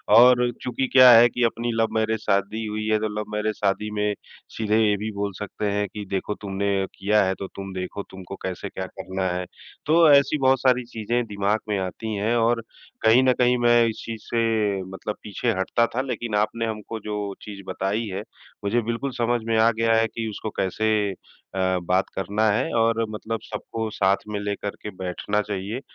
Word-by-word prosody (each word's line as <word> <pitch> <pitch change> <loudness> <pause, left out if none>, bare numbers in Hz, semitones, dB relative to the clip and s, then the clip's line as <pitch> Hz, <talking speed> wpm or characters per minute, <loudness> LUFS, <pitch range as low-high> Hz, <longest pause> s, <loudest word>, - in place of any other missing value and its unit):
और 125 +1 +7
चूँकि 125 +2 -1
क्या 130 -1 +9
है 120 +1 +9
कि 120 +1 -1
अपनी 115 +1 0
लव 115 - +3
मैरिज 110 0 +1
शादी 105 +2 0
हुई 110 0 -3
है, 110 0 +2
तो 110 - -1
लव 105 - -6
मैरिज 105 0 -1
शादी 105 +1 -1
में 105 0 0 0.4
सीधे 110 -1 +1
ये 105 - +3
भी 110 +2 -4
बोल 100 0 -3
सकते 105 0 -4
हैं 105 0 0
कि 105 -1 -6
देखो 100 +1 -2
तुमने 100 -1 -1
किया 105 +1 +2
है। 95 - +1
तो 95 - -4
तुम 95 -1 -6
देखो 95 +2 -4
तुमको 95 0 -9
कैसे, 95 +2 -4
क्या 95 - -5
करना 95 +1 -5
है? 90 +1 -2 0.4
तो 160 0 +5
ऐसी 140 +2 +5
बहुत 130 -1 +3
सारी 125 -1 +3
चीज़ें 120 +1 -2
दिमाग 105 +1 0
में 105 - +1
आती 95 +4 -4
हैं। 110 +4 0
और 115 0 +2 0.4
कहीं 115 +4 +5
न 130 -1 +4
कहीं 125 0 +4
मैं 120 -1 +5
इस 110 - -4
चीज़ 115 -2 -6
से 110 -4 0
मतलब 105 +2 -5
पीछे 105 -2 -2
हटता 115 +5 +2
था, 130 - +2
लेकिन 120 -4 -3
आपने 110 +2 0
हमको 110 0 -5
जो 105 -1 -4
चीज़ 100 -2 -9
बताई 100 +4 -1
है, 100 +1 -4 0.4
मुझे 110 +4 +1
बिल्कुल 115 +4 -3
समझ 120 0 +1
में 115 -1 +1
आ 115 +1 +5
गया 115 0 +1
है 115 0 +3
कि 115 0 -5
उसको 110 +1 -5
कैसे 110 +3 0 0.7
अ, 95 -1 +1
बात 90 +2 +1
करना 105 +3 +1
है। 130 +9 0
और 115 0 +2
मतलब 110 +1 -4
सबको 110 +1 -5
साथ 95 -1 +1
में 105 -1 -2
लेकर 100 0 -3
के - - -5
बैठना 95 +3 -2
चाहिए 105 +3 -4
110 Hz, 200 wpm, -24 LUFS, 100-115 Hz, 0.7 s, क्या